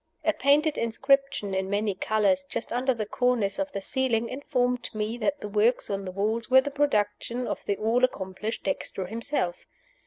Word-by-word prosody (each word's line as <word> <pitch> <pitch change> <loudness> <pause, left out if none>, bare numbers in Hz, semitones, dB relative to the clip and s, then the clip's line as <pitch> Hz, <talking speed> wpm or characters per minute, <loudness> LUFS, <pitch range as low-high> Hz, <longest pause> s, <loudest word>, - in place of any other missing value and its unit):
A 320 - +3
painted 295 +3 +3
inscription 270 -2 +1
in 190 0 -1
many 205 0 0
colors, 220 +8 +1
just - - -4
under 255 +2 +2
the 225 -4 -2
cornice 240 -1 0
of 290 0 -1
the 200 - -4
ceiling, 235 -1 0
informed 250 -3 -1
me 215 +2 -2
that 285 +6 -1
the - - -4
works 215 +3 +2
on 195 0 -2
the 185 - -4
walls 215 +5 -1
were 260 +1 +8
the 285 - -4
production 245 -3 0
of - - -4
the 200 - 0
all 230 +4 +1
accomplished 205 -2 -1
Dexter 195 -9 -3
himself. 220 -3 -2
230 Hz, 180 wpm, -27 LUFS, 205-265 Hz, -, were